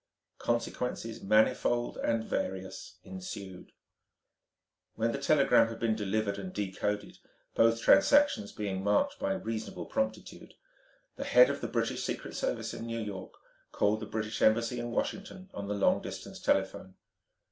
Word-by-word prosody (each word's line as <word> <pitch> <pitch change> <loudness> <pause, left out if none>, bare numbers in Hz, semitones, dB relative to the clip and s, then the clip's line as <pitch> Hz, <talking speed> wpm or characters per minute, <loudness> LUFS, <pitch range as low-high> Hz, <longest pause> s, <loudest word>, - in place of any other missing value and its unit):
Consequences 120 -1 -2
manifold 110 +3 +2
and 115 -1 0
various 95 -3 -4
ensued. 95 0 -8 1.2
When 115 +1 +1
the 140 - -3
telegram 140 -5 +5
had 115 0 -6
been 115 -1 +1
delivered 105 -1 -1
and 95 -2 -6
decoded 105 +1 -3 0.3
both 115 0 +4
transactions 285 - +5
being 95 -2 -3
marked 280 - +2
by 195 - 0
reasonable 115 - -4
promptitude 275 0 -4 0.6
the - - -3
head - - +6
of - - -5
the - - -2
British - - -1
Secret - - -4
Service - - -2
in 115 - -6
New 115 0 -3
York 100 -4 -6 0.4
called 105 +1 +1
the - - -6
British 110 0 -3
Embassy 115 +2 +3
in 120 0 -3
Washington 190 +8 -4
on 100 -1 -5
the 105 - -1
long 100 - +3
distance - - -7
telephone. 95 -1 0
110 Hz, 140 wpm, -31 LUFS, 100-120 Hz, 1.2 s, head